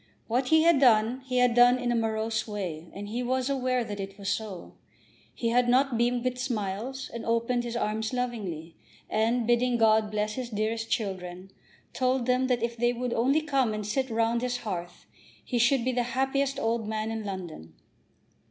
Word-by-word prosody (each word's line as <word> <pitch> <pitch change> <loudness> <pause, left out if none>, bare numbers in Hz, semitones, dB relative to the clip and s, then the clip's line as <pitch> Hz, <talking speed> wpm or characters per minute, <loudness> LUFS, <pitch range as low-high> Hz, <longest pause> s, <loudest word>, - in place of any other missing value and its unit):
What 250 +3 0
he 320 +2 +5
had 335 -4 +5
done, 240 0 +4
he 255 -1 -1
had 250 -1 +4
done 245 +1 +6
in 245 -1 -1
a - - +1
morose 220 0 -1
way, 180 -6 -5
and 205 +1 -7
he 235 +4 -3
was 255 +2 0
aware 255 -2 0
that 205 -2 -6
it 195 0 -6
was 200 -1 -4
so. 200 -3 -4 0.6
He 230 - -1
had 245 +1 +3
not 260 +1 +3
beamed 240 +1 +1
with 255 0 -2
smiles, 240 +1 -3
and 235 - -5
opened 235 +1 0
his 240 -1 -5
arms 215 -1 -1
lovingly, 200 -11 -4 0.4
and, 230 +2 +1
bidding 240 +1 +2
God 220 -1 +4
bless 210 0 -1
his 250 0 -5
dearest 225 +1 -2
children, 185 -3 -3 0.4
told 255 -1 +1
them 255 +1 +2
that 245 -3 0
if 235 0 -1
they 240 +1 +1
would 245 0 -3
only 270 +7 +2
come 270 -7 +1
and 210 -1 -4
sit 260 +5 -1
round 230 +1 +1
his 250 0 -1
hearth 175 -4 -5 0.4
he 245 - -1
should 240 +1 +3
be 255 - +2
the 245 -1 0 0.2
happiest 275 +1 +1
old 225 -3 -1
man 215 0 -2
in 225 -1 -4
London. 175 - -7
235 Hz, 190 wpm, -28 LUFS, 215-250 Hz, 0.6 s, done